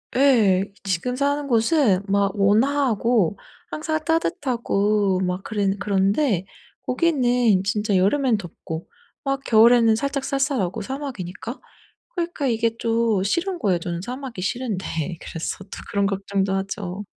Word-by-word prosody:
예. 225 -9 +4 0.2
지금 195 +6 -1
사는 285 +1 0
곳은 230 - +3
막 200 0 +2
온화하고 225 - +2 0.3
항상 315 0 -2
따뜻하고 215 - +1
막 180 +1 -2
그래 205 -3 -1
그런데 200 - +1 0.4
거기는 250 - +2
진짜 210 0 +1
여름에는 235 +5 +2
덥고 165 -3 -7 0.4
막 275 -1 -1
겨울에는 230 -1 +5
살짝 275 +3 -2
쌀쌀하고 270 - -1
사막이니까. 240 -4 -6 0.6
그러니까 340 -5 -2
이게 230 -1 0
좀 230 -3 +1
싫은 345 - -1
거예요. 185 -4 +2
저는 170 0 -4
사막이 250 -2 -6
싫은데 210 -1 -2 0.4
그래서 165 +3 -5
또 - - -27 0.2
그런 200 -1 +1
걱정도 195 0 -1
하죠. 195 0 -4
220 Hz, 285 characters per minute, -23 LUFS, 195-270 Hz, 0.6 s, 겨울에는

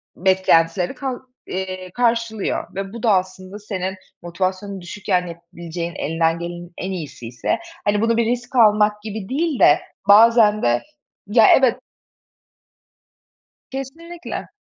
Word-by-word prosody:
beklentileri 180 0 +2
kal 265 -3 -4 0.3
eee, 185 -1 -5
karşılıyor." 230 -5 -1
Ve 195 +1 -5
bu 235 - -8
da 225 - +4
aslında 185 +1 -3
senin 190 -2 -4 0.3
motivasyonun 185 +3 -3
düşükken 180 0 -2
yapılabileceğin, 170 0 -7
elinden 165 +1 0
gelenin 175 0 -7
en 185 - -4
iyisi 155 -9 -7
ise, 120 0 -2 0.3
hani, 205 0 +2
bunu 230 0 +2
bir 235 - +2
risk 240 +2 -3
almak 210 -2 +4
gibi 215 -2 -6
değil 300 0 -1
de, 145 - +6 0.3
bazen 215 0 +6
de 120 0 +2 0.5
ya 220 +1 +5
evet 255 -3 +3 1.9
Kesinlikle. 325 +6 -7
195 Hz, 125 wpm, -21 LUFS, 175-230 Hz, 1.9 s, de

